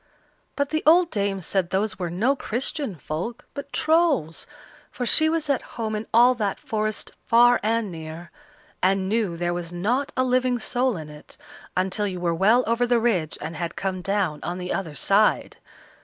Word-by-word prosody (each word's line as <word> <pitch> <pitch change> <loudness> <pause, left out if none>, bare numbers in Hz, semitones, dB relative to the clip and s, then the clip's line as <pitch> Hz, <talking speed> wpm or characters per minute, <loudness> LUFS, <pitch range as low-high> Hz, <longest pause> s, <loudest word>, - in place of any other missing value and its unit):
But 285 -1 -1
the 310 0 0
old 345 +2 +5
dame 200 -2 -1
said 185 +1 -1
those 200 +2 -1
were 175 -2 -2
no 220 +11 +1
Christian 260 - -1
folk, 170 - -5
but 280 0 -8
Trolls, 310 - +1 0.4
for 245 - -4
she 315 +6 +6
was 320 -1 -1
at 280 -3 +1 0.2
home 220 -2 -2
in 215 +1 -5
all 240 +3 +6
that 210 -5 -2
forest 215 0 -3 0.2
far 240 +1 +5
and 220 -1 0
near, 160 +1 -9 0.5
and 190 0 +2
knew 205 -5 -1
there 175 0 -1
was 175 -1 -5
not 235 +11 -1
a 255 - +3
living 255 -1 +1
soul 245 -1 -1
in 155 -2 -7
it, 150 0 -13 0.4
until 190 +3 0
you 185 -2 -5
were 175 -1 0
well 215 +9 +3
over 235 +2 +1
the 240 -1 +3
ridge 190 -10 0
and 165 - -5
had 165 +2 -4
come 190 -1 -3
down 190 -5 -1
on 175 +1 -4
the 180 0 -4
other 165 -6 -4
side. 205 +6 +2
210 Hz, 185 wpm, -24 LUFS, 180-245 Hz, 0.5 s, she